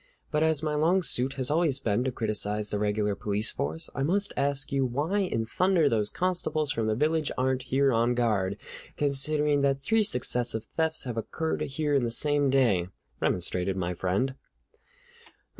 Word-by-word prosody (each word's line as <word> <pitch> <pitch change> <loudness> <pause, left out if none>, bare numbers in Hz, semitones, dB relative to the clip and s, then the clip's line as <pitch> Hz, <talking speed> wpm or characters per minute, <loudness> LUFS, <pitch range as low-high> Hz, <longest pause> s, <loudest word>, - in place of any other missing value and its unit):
But 150 - +1
as 160 -1 +3
my 155 -1 -1
long 170 +5 +2
suit 130 -3 0
has 130 0 -1
always 155 -4 +2
been 110 0 0
to 130 - 0
criticize 105 -2 -1
the 105 - -1
regular 105 0 0
police 105 +2 0
force, 80 +3 -3
I 135 - -4
must 195 +8 +1
ask 140 +1 0
you 135 -1 +1
why 145 +11 -1
in 145 - -1
thunder 180 +4 +2
those 110 -5 +2
constables 155 -5 -1
from 115 -6 -1
the 110 - +1
village 155 +4 0
aren't 130 0 0
here 135 0 +2
on 120 +2 +2
guard, 105 -5 0 0.4
considering 145 +1 +1
that 140 -1 +2
three 225 +10 +1
successive 120 - +1
thefts 160 0 +2
have 120 -4 -5
occurred 160 +8 -3
here 145 +2 -2
in 140 -3 +2
the 120 - 0
same 145 +3 +2
day," 115 -10 +2 0.3
remonstrated 90 +1 -1
my 90 -1 -2
friend. 95 +9 -1
135 Hz, 175 wpm, -27 LUFS, 110-150 Hz, 0.4 s, as